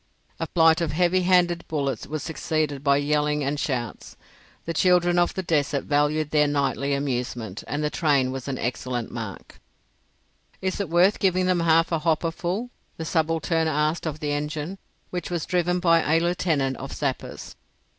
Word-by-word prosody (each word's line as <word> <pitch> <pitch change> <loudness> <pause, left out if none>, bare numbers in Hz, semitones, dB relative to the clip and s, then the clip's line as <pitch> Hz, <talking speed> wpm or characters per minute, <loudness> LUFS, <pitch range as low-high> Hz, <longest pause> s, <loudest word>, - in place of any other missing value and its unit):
A - - -2
flight 165 0 +4
of 160 -3 -1
heavy 180 +3 +2
handed 175 -1 +3
bullets 140 -3 -2
was 155 0 -4
succeeded 155 -3 -2
by 140 -1 +4
yelling 150 0 +1
and 140 +2 -1
shouts. 125 -6 -4 0.5
The 165 - -2
children 175 +1 +3
of 175 - +1
the 190 - -2
desert 145 -4 0
valued 150 +1 +1
their 150 -1 +4
nightly 140 -1 0
amusement, 125 -6 -3
and 145 +1 -2
the 150 - 0
train 140 -5 +2
was 135 0 -6
an 135 -2 -2
excellent 125 -1 -3
mark. 110 -5 -7 1.0
"Is 190 +1 -2
it 200 - -2
worth 180 +5 +4
giving 185 -1 +2
them 180 -1 +2
half 165 0 +3
a 165 - +1
hopper 165 +1 +1
full?" 190 +9 -3 0.3
the 160 - -5
subaltern 165 0 +1
asked 155 +2 0
of 155 -1 -5
the 150 -1 -1
engine, 150 +5 -3 0.3
which 180 -1 -4
was 170 -3 -2
driven 180 0 +1
by 165 -2 +4
a - - +5
Lieutenant 165 -6 0
of 135 - -7
Sappers. 140 -3 -4
155 Hz, 170 wpm, -25 LUFS, 140-175 Hz, 1.0 s, a